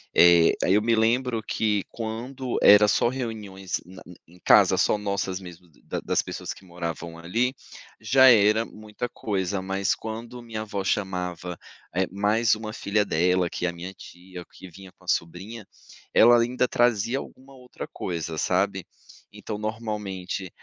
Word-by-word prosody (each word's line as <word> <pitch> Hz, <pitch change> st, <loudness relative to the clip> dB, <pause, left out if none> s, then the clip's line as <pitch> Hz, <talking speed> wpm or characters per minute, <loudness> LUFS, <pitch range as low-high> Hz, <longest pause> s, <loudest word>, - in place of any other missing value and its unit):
Eh, 85 Hz, -1 st, +6 dB
aí 95 Hz, -, +3 dB
eu 105 Hz, -, +4 dB
me 115 Hz, +1 st, +2 dB
lembro 115 Hz, +1 st, +1 dB
que 105 Hz, -3 st, 0 dB
quando 120 Hz, +3 st, -5 dB
era 105 Hz, +1 st, +8 dB
só 105 Hz, -, +2 dB
reuniões 110 Hz, -7 st, -4 dB
na 95 Hz, +1 st, -13 dB
n 90 Hz, -, -12 dB
em 90 Hz, +2 st, -19 dB
casa, -, -, +6 dB
só -, -, +2 dB
nossas 100 Hz, -2 st, -2 dB
mesmo, 90 Hz, -1 st, -12 dB
da -, -, -4 dB
das -, -, 0 dB
pessoas -, -, -6 dB
que 95 Hz, -, -17 dB
moravam 85 Hz, -1 st, -6 dB
ali, 115 Hz, +10 st, 0 dB, 0.5 s
já 130 Hz, +5 st, +5 dB
era 110 Hz, 0 st, +4 dB
muita 110 Hz, +2 st, -7 dB
coisa, 100 Hz, -4 st, -3 dB
mas 95 Hz, +1 st, 0 dB
quando 115 Hz, +2 st, -7 dB
minha 115 Hz, -2 st, -6 dB
avó 105 Hz, -2 st, -4 dB
chamava, 90 Hz, -3 st, -2 dB, 0.4 s
eh, 95 Hz, +1 st, +1 dB
mais 105 Hz, +3 st, +2 dB
uma 110 Hz, 0 st, -7 dB
filha 105 Hz, 0 st, 0 dB
dela 90 Hz, +2 st, +2 dB
que 90 Hz, -, -3 dB
é -, -, +1 dB
a 85 Hz, -, -6 dB
minha 90 Hz, +3 st, -8 dB
tia, 90 Hz, -1 st, -11 dB
que 95 Hz, -, -12 dB
vinha 95 Hz, +1 st, -13 dB
com -, -, -26 dB
a -, -, -21 dB
sobrinha, 95 Hz, +6 st, -3 dB, 0.5 s
ela 120 Hz, +1 st, +7 dB
ainda 125 Hz, +2 st, +1 dB
trazia 120 Hz, +1 st, +1 dB
alguma 135 Hz, 0 st, -12 dB
outra 125 Hz, -1 st, -9 dB
coisa, 80 Hz, -2 st, -4 dB
sabe? -, -, 0 dB, 0.4 s
Então, 105 Hz, -, -6 dB
normalmente, 105 Hz, -4 st, -4 dB
105 Hz, 165 wpm, -25 LUFS, 90-115 Hz, 0.5 s, era